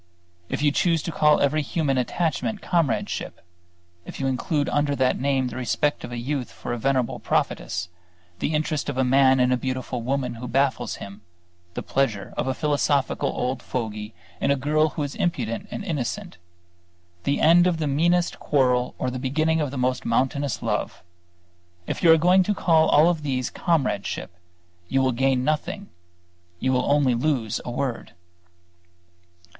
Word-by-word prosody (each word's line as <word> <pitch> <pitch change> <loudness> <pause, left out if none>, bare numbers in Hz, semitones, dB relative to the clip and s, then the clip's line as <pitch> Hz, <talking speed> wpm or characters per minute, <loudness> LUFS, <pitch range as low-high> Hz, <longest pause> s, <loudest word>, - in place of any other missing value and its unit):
If - - -2
you 145 - +4
choose 165 +1 +1
to 170 - -3
call 150 -1 +4
every 150 +2 +2
human 145 -3 0
attachment 175 - -1
comradeship, 165 -10 -1 0.6
if - - -9
you 135 - -1
include 145 +3 0
under 145 -1 +1
that 130 -2 +1
name 135 -2 +1
the 120 - -7
respect 130 +4 0
of - - -7
a 120 - -4
youth 130 +1 -3
for - - -6
a 120 - -3
venerable 130 -1 0
prophetess, 85 0 -1 0.5
the 155 - -1
interest 155 -1 -1
of 140 - -4
a 130 - +3
man 130 +1 +4
in 125 0 +3
a 125 - +3
beautiful 130 -1 -3
woman 130 +1 -1
who 125 - -5
baffles 135 +2 0
him, 100 +1 -10 0.5
the - - -4
pleasure 110 -8 -1
of - - -2
a 130 - 0
philosophical 145 -2 +1
old 125 +1 -2
fogy 110 -3 -5 0.2
in - - 0
a 140 - +4
girl 155 +3 +2
who 150 - -4
is 145 - -4
impudent 115 -10 -2
and - - -5
innocent, 170 - -4 0.8
the 140 - 0
end 175 +2 +6
of 175 -2 +1
the 160 - -2
meanest 170 +5 +1
quarrel 125 -3 +1
or 125 - -2
the 130 - -4
beginning 155 +5 +1
of 145 - -1
the 135 - -6
most 125 0 0
mountainous 135 +3 0
love; - - -2 0.8
if - - -4
you 170 - +7
are 160 - +7
going 180 +4 +5
to 205 +3 0
call 160 -4 +3
all 160 +4 +5
these 135 -6 -3
comradeship, 130 - -1 0.5
you 135 - +1
will 130 -1 +2
gain 130 +1 +1
nothing, 155 +8 -2 0.7
you 130 0 +1
will 125 +2 +1
only 145 -3 +3
lose 120 -3 0
a - - -6
word. 120 0 -3
135 Hz, 170 wpm, -24 LUFS, 125-155 Hz, 0.8 s, you